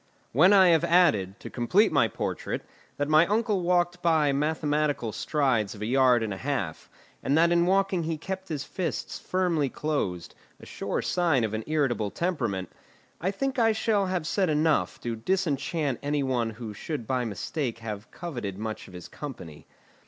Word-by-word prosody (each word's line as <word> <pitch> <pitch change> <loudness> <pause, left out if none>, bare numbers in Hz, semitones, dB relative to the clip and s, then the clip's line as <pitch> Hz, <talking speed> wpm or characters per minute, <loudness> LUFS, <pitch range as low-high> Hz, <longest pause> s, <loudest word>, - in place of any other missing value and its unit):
When 170 - +5
I 190 -3 +7
have 165 -2 +4
added, 130 - +3
to - - -8
complete 185 - +3
my 140 -7 +4
portrait, - - -4 0.3
that 145 - -1
my 155 +2 +5
uncle 210 -2 +1
walked 175 0 +1
by 160 -4 +3
mathematical 150 -3 0
strides 125 -7 0
of 105 - -7
a - - -1
yard 125 -1 +4
and 105 -2 -2
a - - -6
half, 115 - -3 0.3
and 145 - +1
that 170 +1 +4
in 170 0 +3
walking 190 -1 +2
he 160 0 -2
kept 190 +3 -6
his 150 -3 -3
fists 180 -4 -4
firmly 175 -6 0
closed, 105 - -3 0.3
a - - -12
sure - - -3
sign 165 -9 +2
of 110 -1 -2
an 110 0 -2
irritable 135 -9 0
temperament, 120 - -2 0.5
I 180 - 0
think 265 +6 -2
I 225 -1 +4
shall 215 -2 +1
have 180 -4 -2
said 185 +2 +1
enough 155 +1 +1
to 120 -1 -3
disenchant 150 -1 -1
any 145 0 0
one 125 -4 0
who 110 -1 -7
should 120 +3 -5
by 130 +1 0
mistake 115 - -3
have 105 -2 -7
coveted 120 - -6
much 110 +1 -5
of 95 - -13
his 90 - -9
company. 90 - -9
150 Hz, 175 wpm, -27 LUFS, 115-175 Hz, 0.5 s, I